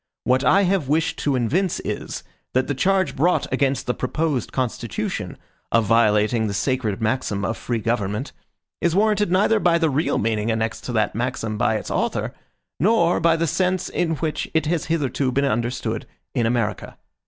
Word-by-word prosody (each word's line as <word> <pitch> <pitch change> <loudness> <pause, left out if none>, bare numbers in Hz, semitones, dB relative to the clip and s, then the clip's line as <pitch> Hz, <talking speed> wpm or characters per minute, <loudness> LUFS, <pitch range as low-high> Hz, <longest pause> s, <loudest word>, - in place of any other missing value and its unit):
What 130 +2 +2
I 195 +10 +5
have 180 -7 +1
wished 160 +3 +1
to 140 -2 +1
evince 160 - 0
is, - - -5 0.3
that 130 +1 +2
the 145 - -1
charge 190 +7 +1
brought 175 +6 +2
against 140 -1 +1
the 125 - 0
proposed 140 -1 -1
Constitution, 120 -6 -3 0.3
of 115 -1 +3
violating 110 +1 +3
the 100 - -3
sacred 125 -5 -1
maxim 110 -3 -1
of 115 - -1
free 120 +1 -2
government, 110 +2 -2 0.5
is 170 0 +1
warranted 210 -2 +2
neither 210 +4 +3
by 175 -3 +3
the 165 -2 +1
real 150 +5 +1
meaning 110 0 0
annexed 110 0 -2
to - - -3
that 110 -2 +1
maxim 115 -2 -2
by 110 - +1
its 110 - -4
author, - - -1 0.5
nor 180 -2 +3
by 165 0 +4
the 165 0 0
sense 185 +3 0
in 165 -2 0
which 155 0 -3
it 160 -1 +2
has 160 +1 0
hitherto 140 -4 0
been 140 +2 +1
understood 120 -2 -2 0.3
in 120 -4 +1
America. 115 -3 -2
130 Hz, 175 wpm, -22 LUFS, 115-165 Hz, 0.5 s, I